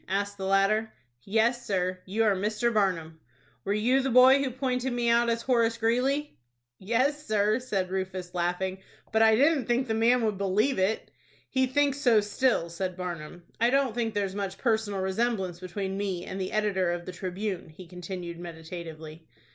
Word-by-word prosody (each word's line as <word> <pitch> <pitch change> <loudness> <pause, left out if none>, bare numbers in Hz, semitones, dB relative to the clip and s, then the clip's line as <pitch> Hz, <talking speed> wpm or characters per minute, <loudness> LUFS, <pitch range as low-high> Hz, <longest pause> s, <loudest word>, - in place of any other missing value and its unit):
asked 200 +1 -1
the 195 -1 -5
latter. 205 +3 +2 0.3
"Yes, 225 - +1
sir, 185 -4 -1
you 215 +4 +1
are 210 -3 +3
Mr. 215 +5 0
Barnum." 170 -6 0 0.4
"Were - - -2
you 245 +6 +2
the 270 - -1
boy 260 +2 +7
who 275 - 0
pointed 255 0 -2
me 240 -1 0
out 235 0 +3
as 230 0 -1
Horace 235 -3 +2
Greeley?" 255 - 0 0.4
"Yes, 260 +9 0
sir," 215 +1 +2
said 195 -7 -2
Rufus, 185 -1 -4
laughing; 180 +2 -1 0.3
"but 220 0 +2
I 220 0 +6
didn't 280 +2 +3
think 245 +2 +1
the 220 - 0
man 230 +2 +3
would 210 -3 -1
believe 200 +6 +1
it." 195 +4 0 0.4
"He 260 0 +2
thinks 285 +1 +1
so 240 -6 +5
still," 210 -2 +1
said 185 +1 -4
Barnum. 175 -2 -6 0.2
"I 235 +1 +4
don't 270 -2 +2
think 225 -2 -2
there's 200 -2 -1
much 200 -1 -4
personal 220 -5 0
resemblance 190 -2 -1
between 190 +1 -4
me 190 -4 -3
and 190 - -5
the 185 - -3
editor 200 -4 +1
of 175 0 -4
the 185 - -5
'Tribune,'" 185 0 -4
he 170 +4 -12
continued, 175 -1 -7
meditatively. 160 -2 -9
205 Hz, 180 wpm, -28 LUFS, 185-235 Hz, 0.4 s, boy